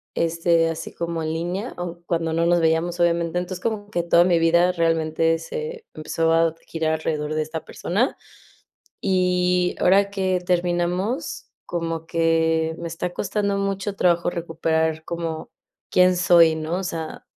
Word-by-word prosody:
este, 165 0 +2
así 165 - -6
como 170 -1 -3
en 155 - -2
línea, 175 +8 -3
aún 175 -1 -6
cuando 165 -1 -1
no 165 +1 +1
nos 175 0 +3
veíamos, 165 +2 +1
obviamente. 170 0 +1
Entonces, 180 0 -5
como 210 -2 -2
que 175 - 0
toda 170 0 +5
mi 175 -2 +3
vida 170 +2 +4
realmente 165 -1 +1
se 465 - -6
empezó 165 +1 -1
a 165 0 +3
girar 160 -1 -1
alrededor 155 -1 -2
de 155 - +1
esta 155 +1 -6
persona, 215 +9 -1 0.9
y 180 -1 +1
ahora 200 +2 +4
que 185 -2 0
terminamos, 180 - -1 0.2
como 165 -1 -3
que 160 -1 +1
me 170 - -4
está 170 +2 -4
costando 200 0 -1
mucho 195 0 -2
trabajo 175 -2 +2
recuperar 160 -2 -1
como 165 -2 -5 0.4
quién 180 0 +4
soy, 170 -2 +5
¿no? 160 +2 -3
O - - -4
sea, 165 -3 -5
170 Hz, 150 wpm, -23 LUFS, 165-180 Hz, 0.9 s, toda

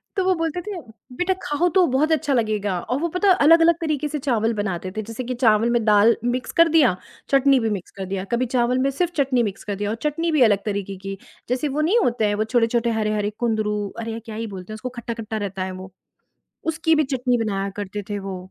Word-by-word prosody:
तो 380 - +1
वो 375 - +4
बोलते 330 +1 -2
थे 395 -2 -6 0.4
"बेटा 370 +1 +1
खाओ 295 +5 +1
तो, 370 -2 +6
बहुत 285 +5 +1
अच्छा 300 -3 +1
लगेगा" 210 -5 0
और 250 +9 -2
वो 340 - +1
पता 370 +4 +1
अलग-अलग 330 +2 +5
तरीके 305 -2 -1
से 295 0 -4
चावल 230 -4 0
बनाते 190 -3 -3
थे, - - 0
जैसे 225 +4 -6
कि 250 +1 -3
चावल 220 +1 +4
में 235 - +2
दाल 210 +2 +5 0.2
मिक्स 255 - -3
कर 335 - +8
दिया, 255 - +5 0.3
चटनी 275 -1 +4
भी 225 -1 0
मिक्स 185 - -9
कर 190 - -3
दिया, 190 -1 -2
कभी 250 +2 +1
चावल 245 +1 +2
में 270 - +2
सिर्फ़ 350 -1 0
चटनी 255 -3 +2
मिक्स 200 -3 -4
कर 200 - -1
दिया 205 +1 -3
और 220 - -1
चटनी 330 +3 0
भी 305 - +2
अलग 200 -1 +1
तरीके 200 -2 -3
की, 195 0 -4 0.3
जैसे 255 +4 0
वो 305 - +2
नहीं 445 +6 +3
होते 235 -2 +1
हैं, 205 - 0
वो 215 - 0
छोटे-छोटे 235 0 +2
हरे-हरे 210 -1 0 0.2
कुंदरू, 215 -2 0 0.2
अरे 225 0 -4
यार, 225 - -5
क्या 220 -3 -7
ही 225 0 -4
बोलते 190 +3 -8
हैं - - -5
उसको, 235 +4 -5
खट्टा-खट्टा 225 -2 -5
रहता 190 -1 -4
है 185 - -4
वो, 190 - -10 0.8
उसकी 320 0 +2
भी 305 - +3
चटनी 250 -1 +1
बनाया 195 -1 -2
करते 205 0 -4
थे 205 - -2
वो, 195 -1 -5
235 Hz, 235 wpm, -22 LUFS, 210-295 Hz, 0.8 s, कर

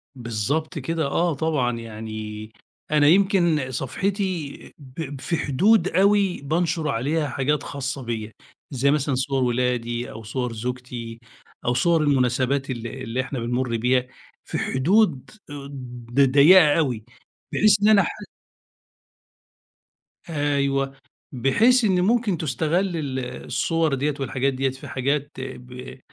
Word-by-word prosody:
بالضبط 130 - -2
كده، 160 +3 -2
آه، 170 +4 +1
طبعًا. 135 -6 0
يعني 110 -1 -7 0.4
أنا 150 -1 +4
يمكن 170 -6 +3
صفحتي 175 - -2 0.2
ب 140 0 -8
في 170 - -1
حدود 185 +9 +3
أوي 195 -3 +2
بانشر 160 +2 -1
عليها 145 +5 0
حاجات 140 +2 -1
خاصة 135 -1 -4
بيا، 110 -2 -4 0.4
زي 140 +1 +2
مثلًا 145 -2 +1
صور 135 0 0
ولادي، 120 -1 -1
أو 110 - -9
صور 120 +2 -3
زوجتي، 120 0 -6 0.5
أو 120 - +2
صور 165 +6 +2
المناسبات 135 0 +1
اللي 120 +1 -5
اللي 125 +1 -2
إحنا 130 0 -5
بنمُر 120 0 -1
بيها، 125 +2 +1 0.4
في - - -4
حدود 160 - +1 0.8
ض 135 +4 +3
ضيقة 150 +3 +7
أوي 125 -8 -1 0.5
بحيث 210 0 +4
إن 205 - +4
أنا 215 -2 +6
ح - - -2 2.2
أيوه، 140 -3 0 0.4
بحيث 225 - +3
إنه 185 -4 +3
ممكن 215 -1 +2
تُستغل 165 +5 -1
ال 135 -4 -3 0.3
الصور 160 +4 0
ديَّة 145 +2 0
والحاجات 135 +1 -1
ديَّة 135 +1 0
في 130 +1 -9
حاجات 140 +2 -1
ب 125 0 -8
135 Hz, 125 wpm, -23 LUFS, 125-160 Hz, 2.2 s, ضيقة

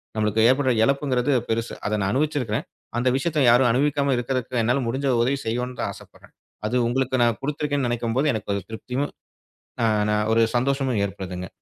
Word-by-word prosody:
நம்மளுக்கு 110 0 +1
ஏற்படுற 130 0 +3
இழப்புங்கறது 135 0 +1 0.2
பெருசு. 115 +1 -1
அதை 105 - 0
நான் 95 0 0
அனுபவிச்சு 150 +3 0
இருக்கேன். 110 -2 -2 0.3
அந்த 120 +2 0
விஷயத்தை 150 +3 0
யாரும் 120 +1 +5
அனுபவிக்காம 140 +2 +1
இருக்கறதுக்கு 125 0 -2
என்னால 125 +4 +1
முடிஞ்ச 135 +4 -1
உதவியை 135 +3 +1
செய்வேன்னு 125 +2 -2
தான் - - -1
ஆசைப்படுறேன். - - -17 0.3
அது 115 - -2
உங்களுக்கு 130 +1 0
நான் 115 -2 +1
கொடுத்து 145 +2 -4
இருக்கேன்னு 145 -3 0
நினைக்கும்போது 120 +4 0
எனக்கு 110 -2 -4
ஒரு 100 - -2
திருப்தியும் 125 +5 -3 1.2
ஒரு 115 0 +4
சந்தோஷமும் 130 -2 0
ஏற்படுதுங்க. 90 -2 -6
125 Hz, 160 wpm, -23 LUFS, 115-140 Hz, 1.2 s, யாரும்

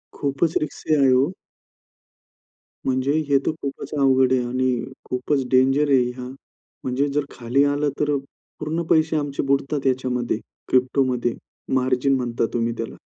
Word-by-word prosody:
खूपच 145 +3 0
रिस्की 155 +1 -1
आहे 140 -2 +4
हो. 135 +7 +3 1.5
म्हणजे 130 +1 +1 0.2
हे 140 -1 +4
तर - - +2
खूपच 140 +1 -5
अवघड 130 -1 +4
आहे 130 - +3
आणि 125 -1 0 0.2
खूपच 130 +2 -1
डेंजर 135 +3 +4
आहे 135 -2 +5
हे. 125 0 -3 0.6
म्हणजे 130 +3 0
जर 145 +1 -1
खाली 125 +3 +1
आलं, 145 +1 +1
तर 145 -1 +1 0.4
पूर्ण 160 +2 -2
पैसे 160 0 +3
आमचे 145 -2 -2
बुडतात 140 0 0
याच्यामध्ये. 125 -3 0 0.3
क्रिप्टोमध्ये 125 -2 +2 0.4
मार्जिन 130 +1 +2
म्हणता 120 -2 -1
तुम्ही 115 0 0
त्याला. 115 - -5
130 Hz, 135 wpm, -23 LUFS, 125-145 Hz, 1.5 s, आहे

